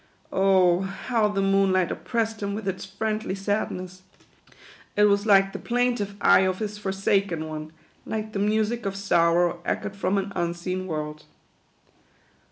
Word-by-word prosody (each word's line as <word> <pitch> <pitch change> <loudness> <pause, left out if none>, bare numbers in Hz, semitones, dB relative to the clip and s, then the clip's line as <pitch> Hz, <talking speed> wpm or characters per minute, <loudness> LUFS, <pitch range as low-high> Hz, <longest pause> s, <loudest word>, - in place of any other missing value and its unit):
Oh, 190 -2 +4
how 210 +3 0
the 200 -1 -1
moonlight 195 -2 +2
oppress 225 -2 -1
ed 220 - -16
him 200 0 -2
with 215 -2 -5
its 190 -1 -3
friendly 215 +1 -3
sadness! 185 -2 -3 0.9
It 210 - +4
was 205 +1 +3
like 195 -1 +5
the - - -5
plaintive 240 -4 -1
eye - - +6
of 185 -1 +1
his 210 0 -4
forsaken 195 -4 0
one; 155 0 -6 0.3
like 215 0 -4
the 200 - -2
music 215 +2 0
of 195 - -3
sorrow 175 -3 +2
echoed 205 - -3
from 195 0 0
an 200 +1 -2
unseen 175 +2 -2
world. 155 -2 -5
195 Hz, 150 wpm, -25 LUFS, 185-210 Hz, 0.9 s, eye